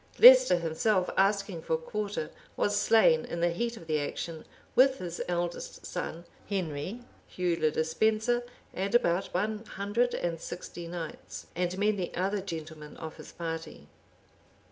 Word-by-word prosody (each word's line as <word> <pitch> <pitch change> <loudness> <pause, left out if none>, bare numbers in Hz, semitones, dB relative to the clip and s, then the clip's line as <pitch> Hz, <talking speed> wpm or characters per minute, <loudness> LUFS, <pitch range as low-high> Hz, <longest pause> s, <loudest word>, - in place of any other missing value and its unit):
Leicester - - +9
himself, 180 +4 +1
asking 200 -3 +2
for 160 - 0
quarter, 200 -1 -4 0.3
was 205 - +1
slain 205 -6 +5
in 170 - -5
the 170 0 +2
heat 235 +7 -2
of 165 - -11
the 155 -1 +1
action, 160 +2 -4 0.3
with 265 +1 +5
his 175 -6 -5
eldest 175 -1 -3
son 170 +2 -5 0.2
Henry, 185 +2 -3 0.3
Hugh 180 -2 0
le 155 - +4
Despenser, 220 +10 +1 0.3
and 195 +4 -1
about 190 -5 +2
one 210 +4 -1
hundred 215 +4 0
and 165 -2 -2
sixty 175 -1 -7
knights, 165 -2 -7
and 180 +1 -1
many 205 -3 +1
other 195 +2 0
gentlemen 160 -4 -7
of 160 -1 -7
his - - -11
party. 165 - -6
180 Hz, 145 wpm, -29 LUFS, 165-210 Hz, 0.3 s, Leicester